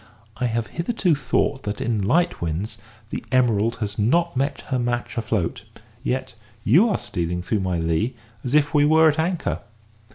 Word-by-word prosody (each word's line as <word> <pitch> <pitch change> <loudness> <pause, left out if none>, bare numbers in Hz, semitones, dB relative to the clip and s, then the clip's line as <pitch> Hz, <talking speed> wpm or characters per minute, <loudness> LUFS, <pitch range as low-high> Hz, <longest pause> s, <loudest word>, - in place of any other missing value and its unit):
I 125 - 0
have 115 0 -1 0.2
hitherto 185 -2 +1
thought 140 -1 0
that, 105 -3 -4
in 110 -3 0
light 170 - +2
winds, 90 +7 -3 0.3
the - - -4
Emerald 115 -3 +3
has 105 -1 -4
not 170 +11 +2 0.4
her 130 -2 +1
match 120 0 -2
afloat; 110 -6 -1 0.4
yet 130 -1 -2 0.3
you 170 - +5
are - - +1
stealing 90 0 -3
through 105 +3 0
my 90 -2 -1
lee 85 +10 0 0.3
as 130 +3 -1
if 150 0 +3
we 145 -1 +5
were 160 +2 +6
at 150 +1 -1
anchor. 170 +2 0
120 Hz, 165 wpm, -23 LUFS, 105-150 Hz, 0.4 s, were